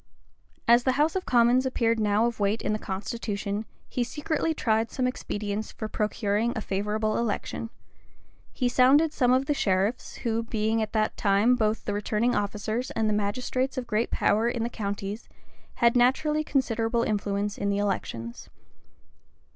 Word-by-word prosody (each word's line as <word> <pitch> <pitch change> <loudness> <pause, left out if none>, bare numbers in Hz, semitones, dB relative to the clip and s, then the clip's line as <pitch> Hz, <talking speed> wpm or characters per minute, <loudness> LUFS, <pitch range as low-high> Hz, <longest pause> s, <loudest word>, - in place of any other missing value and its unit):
As 235 +1 +7
the 260 - +2
house 300 +6 +2
of 375 - -2
commons 245 +1 +4
appeared 230 -3 +1
now 210 +1 +2
of 235 -2 -2
weight 205 +2 0
in - - 0
the 215 - -2
constitution, 205 +1 -4 0.2
he 245 - -1
secretly 310 +5 -1
tried 225 -7 +1
some 255 - -1
expedients 210 -4 -3
for 220 - -5
procuring 215 +1 0
a 220 - -2
favorable 210 +2 -1
election: 225 0 -3 0.8
he 250 - -1
sounded 270 +6 +4
some 250 -2 +2
of 260 +1 +3
the 295 - +1
sheriffs, 200 -1 0
who, 230 0 +1
being 225 0 0
at 215 -1 -3
that 215 -1 +1
time 205 +4 +3
both 220 -2 0
the 205 - -1
returning 215 +4 0
officers, 215 +4 -2
and 215 -2 0
magistrates 250 +6 -1
of 255 - -2
great 230 0 0
power 220 +3 +2
in 240 -1 -2
the 235 - -1
counties, 205 -1 -5 0.5
had 235 0 +3
naturally 300 +5 +3
considerable 235 -4 0
influence 205 -1 -1
in 200 0 -1
elections. 190 - -3
225 Hz, 155 wpm, -27 LUFS, 205-245 Hz, 0.8 s, As